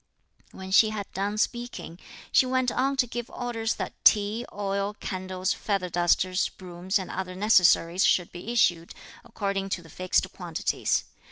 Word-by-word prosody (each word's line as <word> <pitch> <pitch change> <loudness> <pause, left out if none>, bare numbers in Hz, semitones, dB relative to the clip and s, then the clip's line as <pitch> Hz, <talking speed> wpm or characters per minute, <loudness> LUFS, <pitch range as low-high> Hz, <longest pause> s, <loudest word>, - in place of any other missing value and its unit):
When 190 0 -9
she 215 +3 +6
had 210 -2 -4
done 200 +2 -2
speaking, 240 -7 -3 0.3
she 260 - +4
went 255 -1 +1
on 270 +2 0
to 255 - +3
give 240 0 -6
orders 230 -2 -2
that - - -5
tea, 215 +3 +4
oil, 200 0 -2
candles, 185 -1 -3
feather 195 -3 -2
dusters, 180 +2 +2
brooms 185 +2 -3
and 190 -2 -5
other 185 0 -4
necessaries 185 -3 +4
should 180 -2 +2
be 175 +6 -7
issued, 175 -8 +1 0.3
according 200 -4 -3
to 175 -2 -3
the 165 - -15
fixed 185 0 0
quantities. - - -1
195 Hz, 155 wpm, -26 LUFS, 185-225 Hz, 0.3 s, she